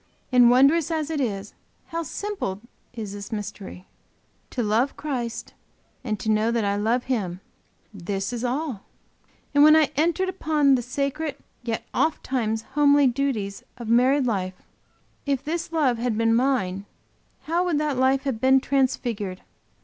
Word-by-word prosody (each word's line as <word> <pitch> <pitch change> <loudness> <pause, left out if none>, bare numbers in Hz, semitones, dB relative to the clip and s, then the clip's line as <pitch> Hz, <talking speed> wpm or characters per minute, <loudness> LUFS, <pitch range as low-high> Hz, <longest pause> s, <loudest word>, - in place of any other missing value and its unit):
And 245 -2 +7
wondrous 275 +6 +4
as 320 -1 -2
it 300 -3 -1
is, 205 -5 -3 0.4
how 335 0 -2
simple 355 - -4 0.3
is 220 -4 -6
this 200 +1 -8
mystery! 205 -3 -6 0.6
To 245 - -2
love 225 +6 +1
Christ 245 -6 -4 0.5
and 215 -5 -2
to 220 - 0
know 215 +1 +2
that 230 -2 0
I 200 0 +1
love 225 +4 +1
Him 195 -9 -2 0.5
this 195 +3 -4
is 240 0 -4
all! 255 -3 -2 0.7
And 285 0 +6
when 305 +1 +8
I 315 -3 +4
entered 340 +5 +1
upon 310 -6 +2
the 255 - +2
sacred 280 +4 -2 0.3
yet 230 -2 -3
oft 315 - 0
times 225 -4 -1
homely 290 -1 +5
duties 240 -6 -1 0.2
of 235 -3 -7
married 255 +4 +4
life, 190 -5 -1 0.7
if 275 -2 0
this 335 +2 -3
love 275 -8 +1
had 235 -2 -1
been 225 0 +3
mine, 230 -7 0 0.6
how 335 +3 0
would 345 -4 +1
that 300 -2 0
life 260 +1 +2
have 260 -6 -3
been 265 +1 +5
transfigured! 240 -8 -1
250 Hz, 155 wpm, -24 LUFS, 220-285 Hz, 0.7 s, when